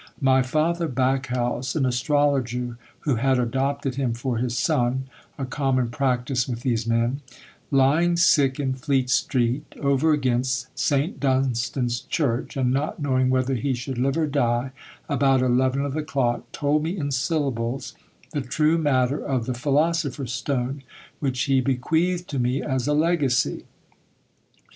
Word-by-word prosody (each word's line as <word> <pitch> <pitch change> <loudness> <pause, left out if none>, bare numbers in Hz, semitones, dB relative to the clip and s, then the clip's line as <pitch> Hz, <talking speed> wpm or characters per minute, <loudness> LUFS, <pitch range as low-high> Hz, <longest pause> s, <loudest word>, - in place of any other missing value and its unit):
My 130 -1 +4
father 160 +6 0
Backhouse 130 -2 -1
(an 145 -4 +1
astrologer 125 -2 0 0.3
who 140 -6 0
had 130 +2 +2
adopted 135 +2 -1
him 125 -4 0
for 120 0 -2
his 120 -1 -1
son, 125 +3 +1 0.3
a 135 - -3
common 130 -2 0
practice 125 -1 0
with 120 -2 -4
these 115 -3 -1
men) 115 +4 +1 0.5
lying 150 +6 +3
sick 145 -6 +4
in 135 -2 0
Fleet 130 -1 0
street, 125 +1 +1 0.2
over 140 +2 +2
against 130 -2 0
St. 140 +1 0
Dunstan's 125 -2 0
church, 135 -1 -2
and 125 -2 +1
not 140 +5 -1
knowing 130 -3 +1
whether 130 +1 +1
he 130 +2 -1
should 125 +1 -5
live 135 +4 +1
or 160 - +2
die, 130 -3 0 0.4
about 135 -2 +2
eleven 130 +2 +2
of 140 - -3
the 155 - -1
clock, 135 -6 -1
told 145 +1 +1
me 165 +5 -3
in 145 -4 -2
syllables 135 -3 -1 0.4
the 145 - -2
true 155 +5 +1
matter 140 -2 +1
of 130 -5 -1
the 125 - -2
philosopher's 145 -1 0
stone, 130 +1 -2 0.4
which 130 -3 -1
he 135 -2 +2
bequeathed 165 +8 0
to 140 - -2
me 125 +3 0
as 130 -2 -1
a 150 - +2
legacy." 150 -5 +1
130 Hz, 150 wpm, -24 LUFS, 125-145 Hz, 0.5 s, My